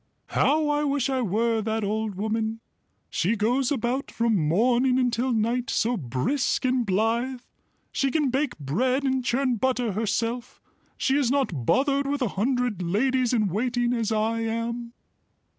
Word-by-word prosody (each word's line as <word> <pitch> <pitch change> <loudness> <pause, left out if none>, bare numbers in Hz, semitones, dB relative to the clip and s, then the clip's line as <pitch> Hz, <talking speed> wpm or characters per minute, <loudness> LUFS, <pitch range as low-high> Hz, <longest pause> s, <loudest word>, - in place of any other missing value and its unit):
"How 305 +1 +2
I 295 0 +1
wish 280 -2 0
I 260 -1 0
were 225 +2 +1
that 220 0 -2
old 215 0 -2
woman. 220 +2 -2 0.5
She 200 +7 +1
goes 240 +5 +1
about 255 0 -1
from 230 -1 +1
morning 240 - +2
until 250 0 +1
night, 235 +2 0
so 240 +2 +1
brisk 170 - -1
and 250 -2 +1
blithe. 230 +6 0 0.5
She 275 - 0
can 290 -2 +1
bake 275 +1 -1
bread 250 - 0
and 265 -1 0
churn 255 0 +1
butter 250 -1 0
herself; 230 +4 -2 0.4
she 270 - +1
is 275 -5 +2
not 245 - -1
bothered 275 +1 +2
with 285 -1 -1
a 235 - 0
hundred 245 -1 -1
ladies 245 +8 +1
in 215 -5 +2
waiting 240 +5 0
as 230 -2 -1
I 220 +1 0
am." 230 +1 -3
240 Hz, 155 wpm, -25 LUFS, 220-260 Hz, 0.5 s, How